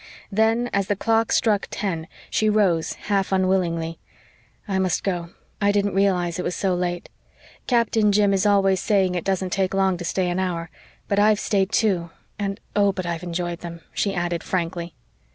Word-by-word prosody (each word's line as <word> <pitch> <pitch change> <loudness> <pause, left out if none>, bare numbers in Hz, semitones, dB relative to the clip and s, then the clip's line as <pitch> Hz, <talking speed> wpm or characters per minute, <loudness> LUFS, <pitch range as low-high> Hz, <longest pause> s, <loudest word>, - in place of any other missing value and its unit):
Then, 225 +4 +2
as 200 -1 +1
the 205 - +1
clock 225 +2 +1
struck 215 -5 +2
ten, 175 -5 -3 0.2
she 215 - +2
rose, 190 -6 +2
half 195 -2 -1
unwillingly. 175 -4 0 0.7
"I 190 -2 0
must 185 -2 0
go. 175 -3 -2 0.3
I 200 0 +4
didn't 205 -1 +1
realise 180 -3 +1
it - - -1
was 180 - -2
so 190 -2 0
late. 175 -1 -2 0.6
Captain 230 -3 +3
Jim 205 -1 +3
is 195 +2 +2
always 195 -2 +3
saying 195 -3 +2
it 175 - -2
doesn't 190 -1 -1
take 190 0 0
long 190 -2 +2
to 175 - -6
stay 180 +1 0
an 175 - -1
hour. 170 -3 -2 0.4
But 200 - +1
I've 210 0 +4
stayed 195 -2 +1
two 185 -7 +1 0.3
and 195 -1 -2 0.2
oh, 200 -1 +4
but 185 -2 -5
I've 170 -1 -3
enjoyed 175 -1 -3
them," 170 -1 -8
she 200 -2 0
added 175 -1 -1
frankly. 170 -2 -3
190 Hz, 180 wpm, -23 LUFS, 175-205 Hz, 0.7 s, I